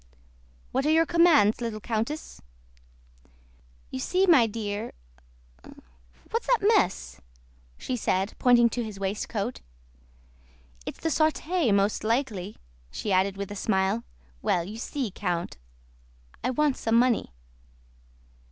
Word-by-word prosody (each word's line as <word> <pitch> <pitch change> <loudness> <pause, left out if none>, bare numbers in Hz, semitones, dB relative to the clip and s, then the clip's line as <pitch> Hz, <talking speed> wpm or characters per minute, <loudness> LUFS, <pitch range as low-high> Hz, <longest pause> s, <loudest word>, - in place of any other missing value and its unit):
"What 265 - 0
are - - +3
your 325 +1 +4
commands, 315 -11 +4
little 230 -2 -3
countess?" 230 +8 -4 1.5
"You - - -4
see, 370 - +1
my 290 -11 +6
dear... 210 -1 -4 1.4
What's 460 - -2
that - - +2
mess?" 180 - 0 0.6
she 255 - -3
said, 195 -3 0
pointing 240 -1 +5
to 240 +1 -3
his 215 -3 -7
waistcoat. 205 +3 -3 1.3
"It's - - -6
the 325 - 0
sauté, 315 - +1
most 200 +1 +1
likely," 215 -4 -1 0.3
she 205 - -4
added 190 +1 +2
with 200 0 -5
a - - -5
smile. 190 - 0 0.4
"Well, 175 - +1
you 205 +5 -8
see, 255 -3 -3
Count, 180 -3 -3 0.9
I - - +1
want 290 +1 +1
some 225 0 0
money." 240 - +2
225 Hz, 120 wpm, -27 LUFS, 200-280 Hz, 1.5 s, my